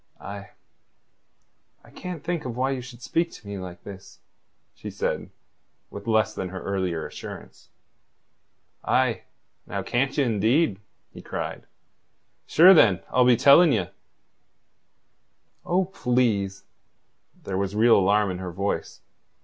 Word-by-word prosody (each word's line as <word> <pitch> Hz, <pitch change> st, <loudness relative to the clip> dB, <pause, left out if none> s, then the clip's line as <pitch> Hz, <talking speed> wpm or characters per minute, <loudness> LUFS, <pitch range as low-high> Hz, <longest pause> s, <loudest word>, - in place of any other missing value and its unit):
"I... 100 Hz, 0 st, -9 dB, 1.3 s
I -, -, -18 dB
can't 180 Hz, -4 st, -7 dB
think 170 Hz, -1 st, -2 dB
why 130 Hz, +2 st, -2 dB
you 130 Hz, -2 st, -3 dB
should 120 Hz, -1 st, -12 dB
speak 170 Hz, +6 st, 0 dB
to 105 Hz, -, -13 dB
me 100 Hz, -1 st, -5 dB
like 90 Hz, -2 st, -9 dB
this," 100 Hz, -2 st, -11 dB, 0.6 s
she -, -, -8 dB
said, -, -, -3 dB, 0.6 s
with 100 Hz, +2 st, -9 dB
less 110 Hz, -1 st, +2 dB
than 95 Hz, -, -5 dB
her 95 Hz, +1 st, -6 dB
earlier 95 Hz, -5 st, -2 dB
assurance. -, -, -10 dB, 1.1 s
"Ah, 130 Hz, -5 st, +2 dB, 0.5 s
now, -, -, -4 dB
can't 135 Hz, +4 st, -1 dB
ye, 145 Hz, -, +3 dB
indeed?" 115 Hz, -, +1 dB, 0.3 s
he -, -, -10 dB
cried. -, -, -6 dB, 0.8 s
"Sure, 180 Hz, +4 st, +8 dB
then, 105 Hz, -, +5 dB
I'll 125 Hz, -1 st, +4 dB
be 125 Hz, -2 st, +5 dB
telling 140 Hz, +5 st, +6 dB
ye." 95 Hz, -6 st, -1 dB, 1.8 s
"Oh, 185 Hz, +2 st, +2 dB
please." 120 Hz, -, -1 dB, 0.8 s
There 95 Hz, -1 st, -3 dB
was 100 Hz, +1 st, -2 dB
real 115 Hz, +2 st, +5 dB
alarm 100 Hz, +1 st, +2 dB
in 90 Hz, -, -5 dB
her 90 Hz, -1 st, -5 dB
voice. 100 Hz, +3 st, -3 dB
110 Hz, 130 wpm, -25 LUFS, 100-130 Hz, 1.8 s, Sure